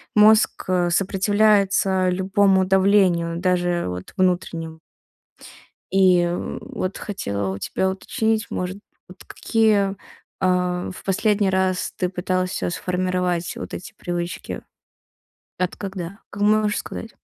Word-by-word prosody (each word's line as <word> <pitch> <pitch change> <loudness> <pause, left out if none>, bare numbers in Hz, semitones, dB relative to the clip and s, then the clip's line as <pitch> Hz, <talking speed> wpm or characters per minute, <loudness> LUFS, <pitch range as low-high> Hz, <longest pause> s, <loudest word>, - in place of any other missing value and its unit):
мозг, 215 +1 +5
э, 180 -1 +2
сопротивляется 195 0 +2
любому 190 +1 +3
давлению, 185 -3 +3
даже 175 -1 0
вот 90 0 -6
внутреннему. 170 -3 -1 1.1
И, 185 -2 +5
м 175 0 -2
вот 185 +1 -4
хотела 100 - -3
у 95 - -3
тебя 190 - -1
уточнить, 220 +3 -1
может, 185 +2 -3 0.3
вот 185 0 -14
какие, 215 -4 +1
э, - - -8 0.5
в 180 0 0
последний 200 +1 +2
раз 190 -1 0
ты 180 - 0
пытался 185 0 -1
сформировать, 180 -1 -1
вот - - -7
эти 220 +5 -7
привычки? 175 0 -4 1.0
От 180 -1 -1
когда? 190 -1 -6
А - - -9
можешь 210 0 +2
сказать? 225 - -7
185 Hz, 115 wpm, -22 LUFS, 180-200 Hz, 1.1 s, мозг